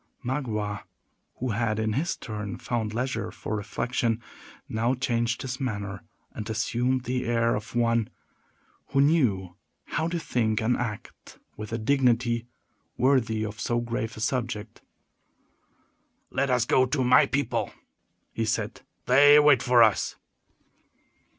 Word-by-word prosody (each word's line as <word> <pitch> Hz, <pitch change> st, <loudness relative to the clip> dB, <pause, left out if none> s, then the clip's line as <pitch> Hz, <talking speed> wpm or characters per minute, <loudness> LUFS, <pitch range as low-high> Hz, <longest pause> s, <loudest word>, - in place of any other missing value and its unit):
Magua, 110 Hz, -6 st, -2 dB, 0.5 s
who 130 Hz, -1 st, -3 dB
had 110 Hz, 0 st, 0 dB
in 110 Hz, -1 st, 0 dB
his 170 Hz, -, -1 dB
turn 105 Hz, -4 st, -5 dB
found 115 Hz, -3 st, -2 dB
leisure 125 Hz, +3 st, -2 dB
for 110 Hz, -, -5 dB
reflection, 115 Hz, +2 st, -1 dB, 0.5 s
now 115 Hz, +4 st, 0 dB
changed 120 Hz, -2 st, -1 dB
his 130 Hz, 0 st, -4 dB
manner, 100 Hz, -7 st, -3 dB, 0.3 s
and 110 Hz, +1 st, -7 dB
assumed 120 Hz, +3 st, 0 dB
the 125 Hz, 0 st, -2 dB
air 115 Hz, 0 st, +2 dB
of 105 Hz, +3 st, -5 dB
one 115 Hz, -2 st, +2 dB, 0.8 s
who 135 Hz, -, 0 dB
knew 115 Hz, -, +2 dB, 0.3 s
how 160 Hz, -, -1 dB
to 170 Hz, +1 st, -2 dB
think 110 Hz, -8 st, 0 dB
and 115 Hz, +2 st, +1 dB
act 105 Hz, -4 st, -6 dB, 0.2 s
with 105 Hz, 0 st, -7 dB
a 115 Hz, -, -1 dB
dignity 120 Hz, -1 st, +1 dB, 0.5 s
worthy 115 Hz, -5 st, +2 dB
of 105 Hz, 0 st, -7 dB
so 120 Hz, +3 st, 0 dB
grave 115 Hz, -1 st, -3 dB
a -, -, -7 dB
subject. 120 Hz, -3 st, -3 dB, 1.5 s
"Let 140 Hz, +1 st, 0 dB
us 125 Hz, -2 st, +2 dB
go 130 Hz, +1 st, +3 dB
to 130 Hz, 0 st, 0 dB
my 125 Hz, +1 st, +6 dB
people," 140 Hz, -2 st, -1 dB, 0.6 s
he 115 Hz, -, -1 dB
said; 110 Hz, 0 st, -2 dB, 0.2 s
"they 145 Hz, +3 st, +7 dB
wait 145 Hz, -4 st, +5 dB
for 125 Hz, -1 st, +6 dB
us." 110 Hz, -3 st, +2 dB
120 Hz, 135 wpm, -26 LUFS, 110-130 Hz, 1.5 s, they